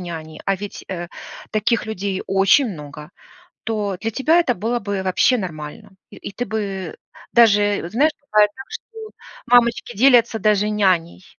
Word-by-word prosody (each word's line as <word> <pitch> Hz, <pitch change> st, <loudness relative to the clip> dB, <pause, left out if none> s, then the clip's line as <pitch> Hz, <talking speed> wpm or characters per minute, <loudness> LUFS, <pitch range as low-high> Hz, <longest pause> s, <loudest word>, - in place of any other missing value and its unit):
няни, 160 Hz, -3 st, -8 dB
а 195 Hz, -, +1 dB
ведь, 205 Hz, +1 st, -8 dB
э, 175 Hz, -2 st, -5 dB, 0.5 s
таких 220 Hz, +2 st, 0 dB
людей 200 Hz, -3 st, -3 dB
очень 195 Hz, +8 st, +4 dB
много, 150 Hz, -1 st, -10 dB, 0.5 s
то 210 Hz, -3 st, -2 dB
для 225 Hz, -, -2 dB
тебя 310 Hz, +9 st, +3 dB
это 260 Hz, -8 st, +1 dB
было 230 Hz, +5 st, -2 dB
бы 200 Hz, -2 st, -3 dB
вообще 190 Hz, +7 st, +2 dB
нормально. 175 Hz, +2 st, -7 dB, 0.2 s
И -, -, -13 dB
и -, -, -8 dB
ты 245 Hz, +5 st, -4 dB
бы 195 Hz, -6 st, -4 dB, 0.4 s
даже 205 Hz, -3 st, +4 dB
вот, 170 Hz, -, -8 dB
знаешь, 295 Hz, +7 st, +3 dB, 0.2 s
бывает 210 Hz, -1 st, +5 dB
так, 265 Hz, 0 st, -10 dB
что -, -, -7 dB, 0.6 s
мамочки 240 Hz, -1 st, +2 dB
делятся 235 Hz, -1 st, +4 dB
даже 210 Hz, -1 st, +2 dB
няней. 185 Hz, -4 st, 0 dB
205 Hz, 160 wpm, -20 LUFS, 185-230 Hz, 0.6 s, бывает